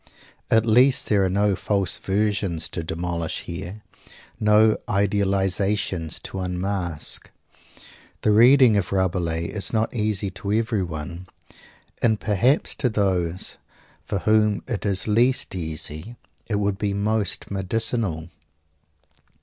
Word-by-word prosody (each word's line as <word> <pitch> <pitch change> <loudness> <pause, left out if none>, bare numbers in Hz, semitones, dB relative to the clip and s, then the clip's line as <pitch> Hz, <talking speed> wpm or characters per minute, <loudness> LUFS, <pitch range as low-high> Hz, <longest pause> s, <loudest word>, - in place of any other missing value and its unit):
At 110 0 +4
least 125 +4 +4
there 100 -2 +3
are 95 - +1
no 100 +1 +2
false 100 -2 -1
versions 100 -4 -1
to 85 - -4
demolish 85 0 -3
here 90 +5 -7 0.6
no 105 +1 +4
idealizations 100 -3 +1
to 95 - -6
unmask. 90 -3 -2 0.9
The 105 - +3
reading 120 +2 +6
of 95 -3 -2
Rabelais 85 -3 0
is 100 +3 -2
not 110 -1 0
easy 105 -4 -1
to 100 +1 -5
everyone, 90 - -2 0.7
and 110 -2 +2
perhaps 115 - +1
to 125 - +1
those 95 -4 -1 0.4
for - - -3
whom 105 +1 +2
it 115 -4 -2
is 95 0 -1
least 120 +5 +2
easy, 80 +4 -4 0.3
he 110 - -1
would 100 -1 -1
be 100 -2 -1
most 105 -1 -1
medicinal. 100 -4 -2
100 Hz, 115 wpm, -23 LUFS, 90-110 Hz, 0.9 s, reading